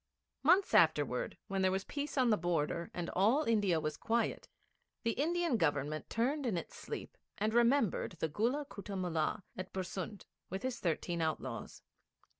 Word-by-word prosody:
Months 355 Hz, +7 st, +4 dB
afterwards 145 Hz, -6 st, +3 dB
when 195 Hz, -1 st, -1 dB
there 190 Hz, -, +4 dB
was 190 Hz, +1 st, 0 dB
peace 290 Hz, +4 st, -4 dB
on 250 Hz, -3 st, +4 dB
the -, -, +6 dB
border, 170 Hz, -1 st, -1 dB
and 175 Hz, -1 st, -4 dB
all 225 Hz, +11 st, +3 dB
India 205 Hz, -, +2 dB
was 155 Hz, -1 st, -3 dB
quiet, 230 Hz, +1 st, 0 dB, 0.6 s
the 230 Hz, -, +2 dB
Indian 330 Hz, +1 st, +1 dB
Government 150 Hz, -3 st, 0 dB
turned 265 Hz, +4 st, 0 dB
in 205 Hz, -7 st, 0 dB
its -, -, -6 dB
sleep -, -, -6 dB, 0.2 s
and 215 Hz, +2 st, 0 dB
remembered 235 Hz, -5 st, +3 dB
the 160 Hz, -1 st, -2 dB
Gulla 235 Hz, -, 0 dB
Kutta 200 Hz, -5 st, -7 dB
Mullah 180 Hz, +2 st, -1 dB
at 185 Hz, 0 st, -6 dB
Bersund, 190 Hz, +2 st, -4 dB, 0.2 s
with 190 Hz, +2 st, -4 dB
his 260 Hz, -1 st, -2 dB
thirteen 170 Hz, 0 st, -1 dB
outlaws. 160 Hz, -1 st, -3 dB
195 Hz, 160 wpm, -34 LUFS, 170-240 Hz, 0.6 s, the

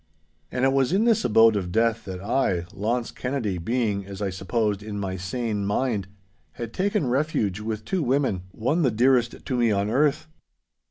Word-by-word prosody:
And 130 Hz, +1 st, +1 dB
it 135 Hz, -, +3 dB
was 135 Hz, 0 st, +2 dB
in 200 Hz, +5 st, +3 dB
this 230 Hz, -3 st, +3 dB
abode 115 Hz, -2 st, +5 dB
of 90 Hz, -3 st, -2 dB
death 115 Hz, +2 st, +1 dB
that 95 Hz, -1 st, -6 dB
I, 100 Hz, -6 st, 0 dB
Launce 115 Hz, +4 st, -1 dB
Kennedy, 120 Hz, -8 st, -2 dB
being, 105 Hz, 0 st, -1 dB
as 95 Hz, 0 st, -9 dB
I 100 Hz, -2 st, -1 dB
supposed, 100 Hz, +2 st, -1 dB
in 105 Hz, -1 st, -5 dB
my 95 Hz, -2 st, -3 dB
sane 105 Hz, +2 st, -3 dB
mind, 105 Hz, -1 st, -1 dB, 0.5 s
had 115 Hz, -1 st, -6 dB
taken 200 Hz, -2 st, 0 dB
refuge 125 Hz, -7 st, 0 dB
with 110 Hz, 0 st, -4 dB
two 190 Hz, +5 st, -1 dB
women, 130 Hz, -, +1 dB
one 135 Hz, -, 0 dB
the 135 Hz, -, +3 dB
dearest 120 Hz, +1 st, +2 dB
to 130 Hz, -, -2 dB
me 120 Hz, -2 st, +3 dB
on 100 Hz, 0 st, 0 dB
earth. 145 Hz, +3 st, +2 dB
115 Hz, 180 wpm, -25 LUFS, 100-130 Hz, 0.5 s, abode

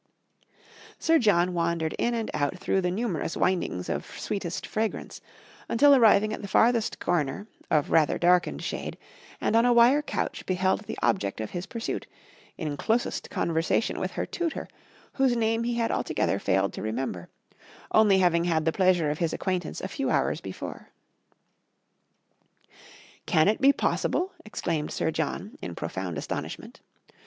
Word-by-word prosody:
Sir 325 Hz, 0 st, +3 dB
John 180 Hz, -5 st, +3 dB
wandered 170 Hz, -2 st, 0 dB
in 240 Hz, 0 st, +1 dB
and 225 Hz, -2 st, -3 dB
out 150 Hz, +4 st, -1 dB
through 190 Hz, +1 st, 0 dB
the 180 Hz, -, 0 dB
numerous 185 Hz, -5 st, -2 dB
windings 170 Hz, -, 0 dB
of -, -, -4 dB
sweetest 180 Hz, -4 st, -3 dB
fragrance, 220 Hz, 0 st, -3 dB, 0.5 s
until 285 Hz, +5 st, +6 dB
arriving 215 Hz, -4 st, +5 dB
at -, -, -5 dB
the 200 Hz, -, -6 dB
farthest 225 Hz, +3 st, +2 dB
corner, 155 Hz, +3 st, -1 dB, 0.2 s
of 150 Hz, -2 st, +1 dB
rather 160 Hz, -2 st, +3 dB
darkened 175 Hz, 0 st, +2 dB
shade, -, -, -4 dB, 0.4 s
and 220 Hz, -, 0 dB
on 230 Hz, -, +5 dB
a 245 Hz, -, +4 dB
wire 240 Hz, +5 st, +6 dB
couch -, -, -3 dB
beheld 185 Hz, +3 st, +1 dB
the -, -, -6 dB
object 100 Hz, -, 0 dB
of 110 Hz, -, -4 dB
his 175 Hz, +3 st, -5 dB
pursuit, 230 Hz, +1 st, -4 dB, 0.5 s
in 150 Hz, -2 st, -3 dB
closest 230 Hz, -, -1 dB
conversation 165 Hz, +7 st, 0 dB
with -, -, -3 dB
her -, -, -2 dB
tutor, 340 Hz, -2 st, -3 dB, 0.5 s
whose 265 Hz, -3 st, +2 dB
name 225 Hz, 0 st, +1 dB
he 240 Hz, 0 st, -1 dB
had 230 Hz, -1 st, 0 dB
altogether -, -, 0 dB
failed 95 Hz, +1 st, +1 dB
to -, -, -6 dB
remember, 110 Hz, -5 st, -4 dB, 0.6 s
only 210 Hz, -3 st, +5 dB
having 175 Hz, -2 st, +3 dB
had 160 Hz, -3 st, +1 dB
the 160 Hz, -, +3 dB
pleasure 180 Hz, -4 st, +2 dB
of 150 Hz, -, -4 dB
his 165 Hz, -2 st, 0 dB
acquaintance 180 Hz, -4 st, -2 dB
a -, -, -3 dB
few 270 Hz, +8 st, -3 dB
hours -, -, +1 dB
before. -, -, -8 dB, 2.4 s
"Can 160 Hz, -3 st, +4 dB
it 215 Hz, +4 st, +1 dB
be 275 Hz, +1 st, +7 dB
possible?" 360 Hz, +6 st, 0 dB
exclaimed 165 Hz, -7 st, -2 dB
Sir 160 Hz, -, -1 dB
John, 160 Hz, +7 st, -4 dB
in 85 Hz, -, -6 dB
profound 90 Hz, +1 st, -4 dB
astonishment. -, -, -6 dB
185 Hz, 155 wpm, -27 LUFS, 160-225 Hz, 2.4 s, be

